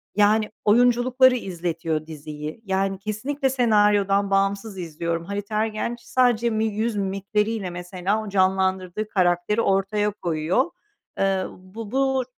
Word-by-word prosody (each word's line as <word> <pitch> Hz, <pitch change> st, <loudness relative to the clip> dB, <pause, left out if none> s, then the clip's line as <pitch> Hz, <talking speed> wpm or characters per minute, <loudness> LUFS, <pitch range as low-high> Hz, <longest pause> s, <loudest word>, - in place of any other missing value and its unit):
yani, 210 Hz, +1 st, +3 dB
oyunculukları 245 Hz, +3 st, +4 dB
izletiyor 165 Hz, -6 st, -3 dB
diziyi. 150 Hz, +3 st, -7 dB
Yani, 195 Hz, 0 st, 0 dB
kesinlikle 260 Hz, +7 st, -2 dB
senaryodan 205 Hz, -5 st, +3 dB
bağımsız 195 Hz, +1 st, 0 dB
izliyorum. 170 Hz, -1 st, -3 dB
Halit 200 Hz, +2 st, -5 dB
Ergenç 220 Hz, +2 st, -1 dB
sadece 240 Hz, -2 st, +2 dB
mi 220 Hz, -1 st, 0 dB
yüz 220 Hz, +1 st, -1 dB
mimikleriyle, 200 Hz, +1 st, -1 dB
mesela, 180 Hz, +4 st, -2 dB
o 215 Hz, -, -7 dB
canlandırdığı 190 Hz, +1 st, +1 dB
karakteri 180 Hz, +2 st, +1 dB
ortaya 205 Hz, +1 st, +1 dB
koyuyor. 175 Hz, -, -1 dB, 0.5 s
Iıı, 195 Hz, -1 st, +1 dB
bu 200 Hz, +4 st, -9 dB
bu 265 Hz, 0 st, +1 dB
200 Hz, 115 wpm, -24 LUFS, 185-220 Hz, 0.5 s, oyunculukları